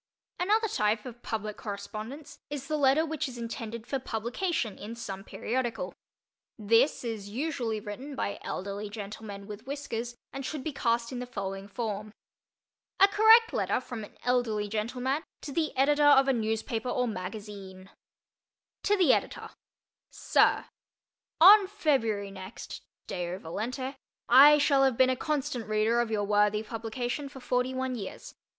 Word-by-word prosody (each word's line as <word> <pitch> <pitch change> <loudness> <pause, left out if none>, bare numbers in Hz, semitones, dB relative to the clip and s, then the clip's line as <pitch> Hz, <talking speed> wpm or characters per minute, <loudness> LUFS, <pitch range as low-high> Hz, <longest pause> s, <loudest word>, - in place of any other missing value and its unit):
Another 430 +5 +2
type 210 - 0
of 240 -1 -9
public 215 -2 -4
correspondence 220 +7 -7
is 285 -2 -5
the 310 - -1
letter 290 +2 +4
which 310 -1 -2
is 245 - -9
intended 230 -1 -5
for 270 - -2
publication 245 - -2
in 220 +3 -7
some 195 -4 -6
periodical. 240 +2 -3 0.6
This 230 +7 +3
is 220 -4 -4
usually 240 -3 -2
written 250 +8 -7
by 200 - -3
elderly 200 +2 -4
gentlemen 205 -1 -7
with 210 +4 -9
whiskers 245 -4 -4 0.2
and 275 - -5
should 280 +1 -4
be 315 - -3
cast 235 -2 0
in 250 - -4
the 250 - -5
following 195 -3 -5
form: 215 -1 -4 0.8
A 390 - +8
Correct 445 +3 +6
Letter - - +1
from 245 -3 -7
an 205 - -12
Elderly 230 -4 +1
Gentleman 245 +7 -1 0.2
to 290 - -6
the 315 +2 0
Editor 290 +2 +3
of 275 -2 +7
a 270 - +4
Newspaper 225 +1 -2
or 250 0 0
Magazine 195 -1 -7 0.9
To 415 +1 +2
the 350 -9 +5
Editor: - - -2 0.6
SIR: - - +2 0.7
On 395 +4 +9
February 245 - 0
next, 190 +2 -8 0.2
Deo 175 0 -4
volente, 245 - -4 0.3
I 285 +5 +9
shall 280 -2 +4
have 265 -3 +2
been 260 0 +5
a - - +1
constant 260 -5 -2
reader 215 +2 +2
of 235 - -2
your 215 -2 0
worthy 210 +1 +2
publication 240 +5 -4
for 270 - -11
forty 250 +1 0
one 260 0 -1
years. 210 -6 -7
235 Hz, 150 wpm, -29 LUFS, 210-275 Hz, 0.9 s, On